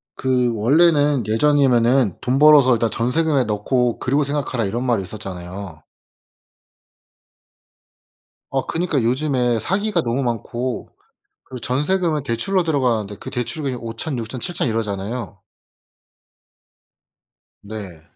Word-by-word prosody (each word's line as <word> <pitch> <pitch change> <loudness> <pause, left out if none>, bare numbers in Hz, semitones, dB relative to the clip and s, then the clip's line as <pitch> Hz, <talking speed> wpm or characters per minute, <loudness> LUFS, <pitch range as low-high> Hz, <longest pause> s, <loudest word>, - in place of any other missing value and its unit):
그 125 -2 +1
원래는 145 +3 +3
예전이면은 125 - +3
'돈 130 +2 0
벌어서 145 -4 +7
일단 115 -1 0
전세금에 135 +5 +1
넣고 120 +3 0
그리고 140 +4 +1
생각하라.' 140 -4 -2
이런 115 +5 -2
말이 120 -5 +1
있었잖아요. 90 -3 -8 2.7
어. 135 -1 -1
그니까 165 -5 -1
요즘에 125 -1 +1
사기가 195 - 0
너무 120 +2 -1
많고 120 +1 -3 0.6
그리고 130 -1 -9
전세금은 150 +4 0
대출로 145 +10 0
들어가는데 120 -10 0
그 - - -7
대출금이 130 +2 -3
5,000, 115 +4 -5
6000, 115 +3 -5
7000 175 -1 -1
이러잖아요. 110 -1 -4 2.3
네. 100 -6 -8
125 Hz, 255 characters per minute, -20 LUFS, 115-145 Hz, 2.7 s, 벌어서